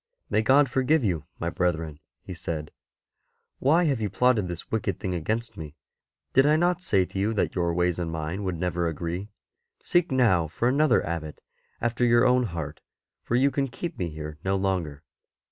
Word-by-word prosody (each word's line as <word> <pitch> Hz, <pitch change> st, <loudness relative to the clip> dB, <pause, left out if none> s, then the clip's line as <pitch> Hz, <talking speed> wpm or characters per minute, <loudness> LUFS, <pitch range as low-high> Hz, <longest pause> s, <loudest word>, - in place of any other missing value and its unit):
May -, -, +3 dB
God 135 Hz, +5 st, +5 dB
forgive 130 Hz, +4 st, +2 dB
you, 90 Hz, -8 st, -1 dB
my 85 Hz, +1 st, -2 dB
brethren," 80 Hz, -4 st, -1 dB, 0.2 s
he 95 Hz, -, -7 dB
said; 80 Hz, -3 st, -5 dB, 0.4 s
" -, -, -50 dB
why 160 Hz, +7 st, +4 dB
have 140 Hz, -8 st, +1 dB
you 105 Hz, -, -1 dB
plotted 110 Hz, 0 st, +2 dB
this 85 Hz, -1 st, -7 dB
wicked 100 Hz, -4 st, -1 dB
thing 95 Hz, -, -3 dB
against 110 Hz, +8 st, -3 dB
me? 75 Hz, -2 st, -8 dB, 0.6 s
Did 135 Hz, +2 st, +5 dB
I 150 Hz, -, +5 dB
not 175 Hz, +2 st, +1 dB
say 100 Hz, -, +2 dB
to 95 Hz, -, -6 dB
you 110 Hz, +3 st, 0 dB
that 100 Hz, -, 0 dB
your 85 Hz, -2 st, 0 dB
ways 90 Hz, 0 st, 0 dB
and 85 Hz, -2 st, -2 dB
mine 80 Hz, +5 st, -4 dB
would 95 Hz, -2 st, -2 dB
never 90 Hz, 0 st, 0 dB
agree? 85 Hz, +5 st, -4 dB, 0.5 s
Seek 175 Hz, -2 st, +2 dB
now 105 Hz, -11 st, +3 dB
for 85 Hz, +9 st, -1 dB
another 140 Hz, +1 st, +3 dB
Abbot 80 Hz, -2 st, -5 dB, 0.4 s
after 120 Hz, +1 st, -1 dB
your 120 Hz, 0 st, +5 dB
own 125 Hz, 0 st, +4 dB
heart, 80 Hz, -6 st, -5 dB, 0.4 s
for 120 Hz, -, -2 dB
you 135 Hz, +3 st, +4 dB
can 135 Hz, 0 st, 0 dB
keep 170 Hz, +6 st, -6 dB
me 90 Hz, -2 st, -1 dB
here 75 Hz, -1 st, -7 dB
no 95 Hz, +1 st, +1 dB
longer." 90 Hz, -7 st, -2 dB
95 Hz, 190 wpm, -26 LUFS, 85-125 Hz, 0.6 s, God